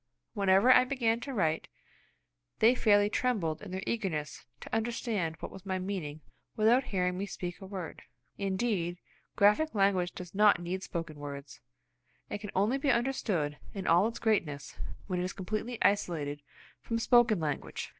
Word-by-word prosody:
Whenever 200 Hz, +3 st, +4 dB
I 255 Hz, -, +7 dB
began 245 Hz, -3 st, 0 dB
to 275 Hz, -, -6 dB
write, 165 Hz, -9 st, 0 dB, 0.9 s
they 230 Hz, +3 st, +6 dB
fairly 205 Hz, -4 st, +4 dB
trembled 205 Hz, -9 st, 0 dB
in 210 Hz, -, -8 dB
their 190 Hz, +1 st, -4 dB
eagerness 180 Hz, -10 st, -3 dB
to -, -, -4 dB
understand 225 Hz, -7 st, -1 dB
what -, -, -6 dB
was 190 Hz, -, -11 dB
my 190 Hz, -1 st, -2 dB
meaning 180 Hz, -6 st, -4 dB, 0.3 s
without 235 Hz, +4 st, +4 dB
hearing 180 Hz, -1 st, -1 dB
me 200 Hz, -, -2 dB
speak 180 Hz, -1 st, -6 dB
a 190 Hz, -, -8 dB
word. 190 Hz, -4 st, -6 dB, 0.3 s
Indeed, 190 Hz, -3 st, -1 dB, 0.4 s
graphic 210 Hz, +9 st, +3 dB
language 195 Hz, -3 st, +2 dB
does 180 Hz, -2 st, -9 dB
not 205 Hz, 0 st, +5 dB
need 175 Hz, +2 st, -3 dB
spoken 165 Hz, -5 st, -5 dB
words. 140 Hz, -1 st, -8 dB, 0.7 s
It -, -, -3 dB
can 210 Hz, -, -6 dB
only 215 Hz, +8 st, +2 dB
be 280 Hz, -, 0 dB
understood 215 Hz, -, 0 dB, 0.2 s
in 195 Hz, -2 st, -4 dB
all 175 Hz, +5 st, +5 dB
its 230 Hz, -, -5 dB
greatness 150 Hz, -11 st, -1 dB, 0.3 s
when 180 Hz, -2 st, -2 dB
it -, -, 0 dB
is 185 Hz, -, -3 dB
completely 215 Hz, +5 st, -4 dB
isolated 155 Hz, -8 st, +1 dB, 0.4 s
from 230 Hz, -, -2 dB
spoken 230 Hz, -3 st, +4 dB
language. 150 Hz, -3 st, -3 dB
195 Hz, 160 wpm, -31 LUFS, 175-225 Hz, 0.9 s, I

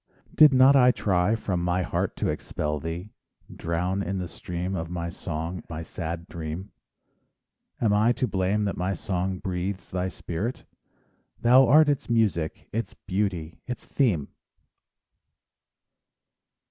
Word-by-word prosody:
Did 155 Hz, -2 st, +8 dB
not 130 Hz, +1 st, +7 dB
I 125 Hz, -2 st, +7 dB
try 100 Hz, -3 st, +2 dB
from 95 Hz, -6 st, -2 dB
my 90 Hz, +1 st, +1 dB
heart -, -, -1 dB
to -, -, -1 dB
expel 75 Hz, 0 st, -2 dB
thee, 85 Hz, +7 st, -5 dB, 0.4 s
Drown 90 Hz, +4 st, -1 dB
in 95 Hz, 0 st, -2 dB
the 90 Hz, -1 st, -3 dB
stream 90 Hz, +3 st, -5 dB
of 80 Hz, -2 st, -3 dB
my 85 Hz, -1 st, -3 dB
song 85 Hz, +1 st, -4 dB
my 80 Hz, 0 st, -5 dB
sad 85 Hz, +1 st, -5 dB
dream? 85 Hz, +4 st, -6 dB, 1.1 s
Am 110 Hz, -3 st, +2 dB
I 110 Hz, +3 st, +4 dB
to 125 Hz, -, -1 dB
blame 100 Hz, +1 st, 0 dB
that 100 Hz, -, -1 dB
my 95 Hz, +2 st, -1 dB
song 95 Hz, +1 st, -2 dB
breathes 95 Hz, +1 st, -4 dB
thy 90 Hz, 0 st, -1 dB
spirit— 95 Hz, +6 st, -4 dB, 0.7 s
Thou 130 Hz, +3 st, +6 dB
art 150 Hz, +5 st, +7 dB
its 145 Hz, -4 st, 0 dB
music, 105 Hz, -9 st, 0 dB
its 115 Hz, +2 st, -3 dB
beauty, 90 Hz, -5 st, -3 dB
its 125 Hz, -, -5 dB
theme! 100 Hz, -, +1 dB
95 Hz, 135 wpm, -26 LUFS, 85-110 Hz, 1.1 s, Did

